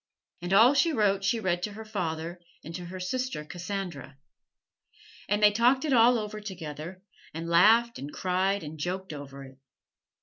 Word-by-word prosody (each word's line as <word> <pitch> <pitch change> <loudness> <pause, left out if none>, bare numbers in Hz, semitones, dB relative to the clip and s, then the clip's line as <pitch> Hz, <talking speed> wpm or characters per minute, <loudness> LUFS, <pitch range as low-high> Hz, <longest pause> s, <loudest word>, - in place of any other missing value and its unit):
And 175 +1 -5
all 225 +7 +7
she 330 +4 +3
wrote 200 -5 +1
she 225 +4 +1
read 175 -4 -1
to 205 +3 -4
her 220 +2 -9
father 175 -4 -4 0.2
and 165 - -8
to 175 +1 -6
her 185 +2 -8
sister 250 -3 -3
Cassandra. 175 -5 -6 1.1
And 205 +1 +1
they 210 - +8
talked 245 +7 +3
it 290 - +1
all 240 0 +6
over 215 -1 -5
together 175 -2 -8 0.3
and 165 +1 -5
laughed 225 +8 +4
and 140 +2 -7
cried 190 +2 0
and 155 +1 -8
joked 185 +2 -4
over 140 -1 -9
it. 130 0 -14
190 Hz, 170 wpm, -28 LUFS, 165-215 Hz, 1.1 s, they